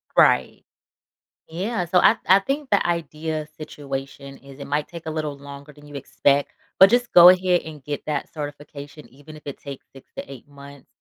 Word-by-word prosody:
Right. - - +3 0.9
Yeah, 185 +4 -3
so, 180 +2 +2
I - - +5
I 190 +2 +6
think 275 +6 -4
the 200 - +2
idea 160 -2 -3
situation 140 -2 -8
is, 140 0 -15
it 140 - -7
might 145 +1 -2
take 170 -2 -11
a - - -2
little 155 -2 -4
longer 140 +1 -12
than 145 0 -18
you 145 - -12
expect, 140 +1 0 0.3
but 190 - +9
just 245 +1 +1
go 175 0 +9
ahead 180 -1 +3
and 155 -3 -11
get 145 +1 -6
that 150 -2 -3
certification 145 0 -9
even 145 +4 -15
if 150 - -14
it 140 - -7
takes 140 -2 -10
6 135 - -17
to - - -8
8 135 -1 -12
months. 140 -1 -14
150 Hz, 190 wpm, -22 LUFS, 140-170 Hz, 0.9 s, but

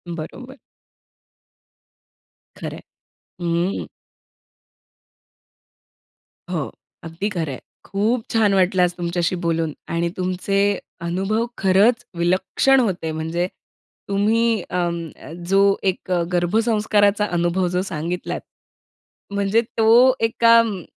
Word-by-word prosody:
बरोबर. 255 - -9 2.0
खरंय. - - -6 0.6
अं. 170 +2 -1 2.6
हो. - - -2 0.3
अगदी 165 +5 -3
खरंय. 160 -9 -3 0.3
खूप 220 +4 0
छान 215 -3 +3
वाटलं 185 -1 +3
आज 175 0 +1
तुमच्याशी 175 0 -1
बोलून 165 -2 0 0.2
आणि 170 0 0
तुमचे 185 +2 -1 0.4
अनुभव 195 +7 -1
खरंच 205 +6 +3
विलक्षण 185 +10 +2
होते. 185 -9 -1
म्हणजे 160 +3 -2 0.6
तुम्ही 220 +2 +2
अं, 170 -2 -2 0.4
जो 195 +1 +4 0.3
एक 185 0 -2 0.2
गर्भसंस्काराचा 210 +2 +2
अनुभव 175 +2 +1
जो 180 - +1
सांगितलात, 175 -1 -4 0.9
म्हणजे 200 +3 +2 0.2
तो 235 +4 +6
एका 230 0 +4
अं, 210 -6 -1
190 Hz, 90 wpm, -21 LUFS, 170-220 Hz, 2.6 s, तो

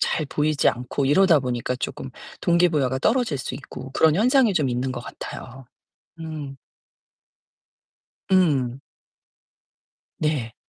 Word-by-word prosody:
잘 155 - 0
보이지 150 0 +1
않고 125 +3 -2
이러다 165 +3 +5
보니까 125 -1 -2
쪼끔 130 +1 -5 0.3
동기 175 0 +3
부여가 130 -4 0
떨어질 225 - +1
수 130 - -5
있고 135 0 -9
그런 160 0 +4
현상이 240 -1 +4
좀 150 -6 +1
있는 125 +2 -1
것 120 - -5
같아요. 130 0 -9 0.5
음. 150 -4 -6 1.7
음. 140 -9 +2 1.4
네. 140 -7 -1
140 Hz, 225 characters per minute, -23 LUFS, 130-165 Hz, 1.7 s, 이러다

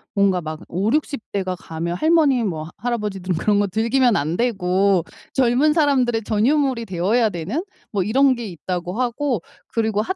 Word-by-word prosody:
뭔가 195 -2 +3
막 155 -1 -6
50-60 230 - 0
대가 185 -2 -1
가면 170 0 -4
할머니 300 - +3
뭐 160 -6 -3
할아버지들은 205 -7 -2
그런 205 +3 +2
거 205 - +2
즐기면 230 +4 +2
안 155 +4 0
되고 195 -5 +2 0.3
젊은 265 +4 +3
사람들의 255 -8 +2
전유물이 240 +3 +1
되어야 210 +6 +1
되는 195 - -3 0.3
뭐 200 -3 0
이런 260 +5 +3
게 235 -1 -6
있다고 180 0 -4
하고 245 - -1 0.3
그리고 220 -2 0
215 Hz, 315 characters per minute, -21 LUFS, 185-250 Hz, 0.3 s, 뭔가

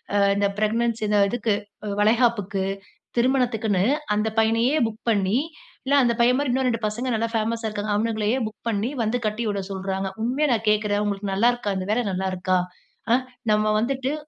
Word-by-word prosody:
அ - - +4 0.2
இந்த 200 0 +2
ப்ரெக்னன்சி 225 +1 0
இந்த 210 -1 +3
இதுக்கு 230 -3 0 0.3
அ - - -3
வளைகாப்புக்கு, 215 -3 +2 0.5
திருமணத்துக்குன்னு, 235 -6 +1 0.3
அந்த 210 +1 0
பையனையே 230 +6 +2
புக் 220 -1 -5
பண்ணி, 200 -1 +2 0.5
இல்ல 280 - 0
அந்த 235 - +2
பையன்மாரி 255 +3 +3
இன்னும் 260 +1 +1
ரெண்டு 230 -2 -1
பசங்க 235 +5 -3
நல்லா 230 +1 -1
ஃபேமஸா 225 0 -1
இருக்காங்க. 210 0 -2
அவனுங்களையே 220 +2 0
புக் 220 - -13
பண்ணி 215 +1 -1
வந்து 225 +3 0
கட்டிவிட 210 -2 -2
சொல்றாங்க. 190 0 -3 0.2
உண்மையா 275 +6 +1
நான் 220 -1 -2
கேக்குறேன், 210 -1 +1
உங்களுக்கு 200 -1 -2
நல்லாருக்கா? 230 0 +1
இந்த 185 +1 -4
வேலை 245 +2 +1
நல்லாருக்கா? 185 0 0 0.6
அ! 245 - +6 0.4
நம்ம 215 0 +2
வந்துட்டு 265 +3 -1
220 Hz, 160 wpm, -24 LUFS, 205-235 Hz, 0.6 s, அ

